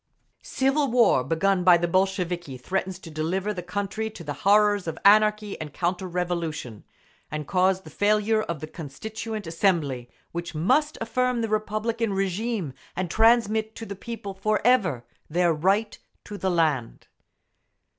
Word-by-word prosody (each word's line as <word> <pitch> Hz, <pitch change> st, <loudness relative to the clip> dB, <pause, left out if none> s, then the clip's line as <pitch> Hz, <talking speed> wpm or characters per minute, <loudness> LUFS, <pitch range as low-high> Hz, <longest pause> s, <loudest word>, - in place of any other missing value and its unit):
Civil 270 Hz, +1 st, +1 dB
war, 235 Hz, -, +4 dB
begun 180 Hz, +6 st, +1 dB
by 175 Hz, -1 st, +7 dB
the 175 Hz, 0 st, 0 dB
Bolsheviki, 180 Hz, -5 st, -1 dB
threatens 185 Hz, +7 st, -3 dB
to 175 Hz, -4 st, -11 dB
deliver 180 Hz, +7 st, -1 dB
the 180 Hz, -, -5 dB
country 205 Hz, +4 st, -3 dB
to 200 Hz, -5 st, -11 dB
the 145 Hz, -2 st, -4 dB
horrors 205 Hz, +3 st, +3 dB
of 165 Hz, -, -3 dB
anarchy 210 Hz, -1 st, +4 dB
and 150 Hz, -2 st, -7 dB
counter 180 Hz, +2 st, -1 dB
revolution, 170 Hz, -, -3 dB, 0.5 s
and 150 Hz, 0 st, -4 dB
cause 185 Hz, 0 st, +2 dB
the 155 Hz, -, -13 dB
failure 215 Hz, +4 st, +2 dB
of 170 Hz, -8 st, -4 dB
the -, -, -3 dB
Constituent 215 Hz, +8 st, -6 dB
Assembly, 165 Hz, -8 st, 0 dB, 0.2 s
which 170 Hz, -1 st, -5 dB
must 295 Hz, -, +2 dB
affirm 250 Hz, +1 st, 0 dB
the 225 Hz, -, -2 dB
republican 215 Hz, +1 st, -1 dB
régime 195 Hz, -, -2 dB, 0.2 s
and 180 Hz, -2 st, -2 dB
transmit 220 Hz, 0 st, +3 dB
to 225 Hz, -, -7 dB
the 200 Hz, -, -6 dB
People 205 Hz, -1 st, -7 dB
forever 200 Hz, -, +1 dB, 0.2 s
their 170 Hz, +1 st, +2 dB
right 195 Hz, +7 st, +1 dB, 0.2 s
to 210 Hz, -, -8 dB
the 190 Hz, -2 st, -1 dB
land. 155 Hz, -9 st, 0 dB
190 Hz, 145 wpm, -25 LUFS, 170-215 Hz, 0.5 s, by